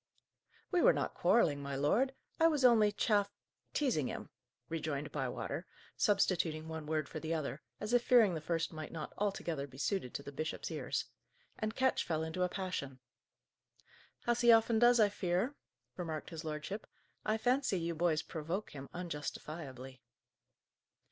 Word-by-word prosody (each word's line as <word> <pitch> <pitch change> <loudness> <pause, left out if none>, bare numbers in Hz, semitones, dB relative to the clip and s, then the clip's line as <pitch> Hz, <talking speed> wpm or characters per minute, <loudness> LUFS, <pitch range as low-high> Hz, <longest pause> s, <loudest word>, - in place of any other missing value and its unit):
"We 360 -2 +3
were - - +7
not - - -1
quarrelling, 145 -11 +3
my 140 0 -4
lord. 230 - +2 0.2
I 325 - +7
was 295 -5 +2
only 220 -4 +6
chaff 205 -1 +2 0.4
teasing 240 - +1
him," - - -6 0.4
rejoined 150 -3 -3
Bywater, 135 -4 -3 0.3
substituting 170 -6 +2
one 160 -1 -5
word 155 -2 0
for 155 - -6
the 160 +1 -2
other, 150 -1 -3 0.2
as 210 +3 -3
if 245 -1 +5
fearing 230 -7 +6
the 160 - -3
first 165 +1 -1
might 155 -1 -6
not 155 -2 -6
altogether 170 -8 -1
be 130 -1 -14
suited 165 - -1
to 140 - -3
the 140 - -7
bishop's 155 +3 -4
ears; - - -2 0.5
"and 215 0 -2
Ketch 260 0 +2
fell 160 -2 -1
into 160 +3 -3
a 180 - +3
passion." 180 -9 -4 1.3
"As 240 0 +2
he 240 -1 +7
often 225 0 +5
does, 240 0 +6
I 215 - +7
fear," 190 +6 0 0.4
remarked 160 -2 -4
his 165 -1 -6
lordship. 155 +7 -4 0.4
"I 215 +1 +1
fancy 245 -4 +2
you 170 0 -1
boys 160 -1 +1
provoke 170 +5 -4
him 135 -1 -8
unjustifiably." 150 -6 -6
170 Hz, 160 wpm, -34 LUFS, 155-215 Hz, 1.3 s, were